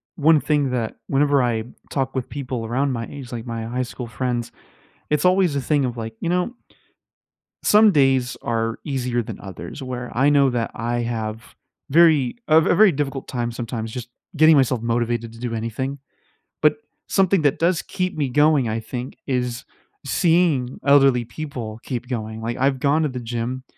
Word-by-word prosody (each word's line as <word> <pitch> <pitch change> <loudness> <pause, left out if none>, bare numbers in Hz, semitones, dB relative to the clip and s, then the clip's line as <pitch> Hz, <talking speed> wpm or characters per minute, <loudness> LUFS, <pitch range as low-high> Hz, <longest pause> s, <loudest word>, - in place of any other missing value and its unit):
one 155 +1 +5
thing 145 -2 +1
that 115 -3 -2
whenever 140 0 +3
I 115 -3 0 0.3
talk 135 -2 -2
with 130 -2 -3
people 125 -4 -4
around 130 +4 0
my 115 -2 -3
age, 135 -4 -9
like 120 0 -5
my 115 -1 -4
high 125 +3 -2
school 125 0 -7
friends, 120 0 -3 0.6
it's 150 +1 +1
always 180 -5 +3
a - - 0
thing 145 0 +1
of, 120 -1 -4
like, 115 0 -5
you 170 - -1
know 180 +6 0 1.1
some 210 0 +6
days 135 -3 +3
are 115 -1 -1
easier 125 -5 -1
than - - -8
others 95 - -8
where 125 -1 -5
I 135 +4 +4
know 140 -2 +4
that 120 -2 -2
I 120 +1 -2
have 110 -2 -3 0.5
very 155 -4 +4
a 155 +1 +7
ve 165 - +2
very 205 0 +6
difficult 135 -2 -3
time 120 -2 -2
sometimes 115 -1 -5
just 120 0 -6 0.3
getting 155 +1 +6
myself 130 -3 +2
motivated 115 0 -1
to 115 - -13
do 120 -1 -3
anything, 130 +5 -3 0.6
but 150 -1 +4 0.3
something 195 -2 +3
that 145 -2 +2
does 170 0 +2
keep 185 -1 -3
me 140 -4 0
going, 145 -3 +3
I 110 +1 -1
think, 120 +3 -6
is 125 -2 -2 0.4
seeing 160 -5 +2
elderly 135 -4 +5
people 120 -3 -6
keep 125 -2 -4
going. 110 -3 -4
Like, 120 +1 -3
I've 135 0 +1
gone 145 +3 +2
to 150 - +1
the 125 -1 -5
gym 120 +2 -4
130 Hz, 180 wpm, -22 LUFS, 120-145 Hz, 1.1 s, a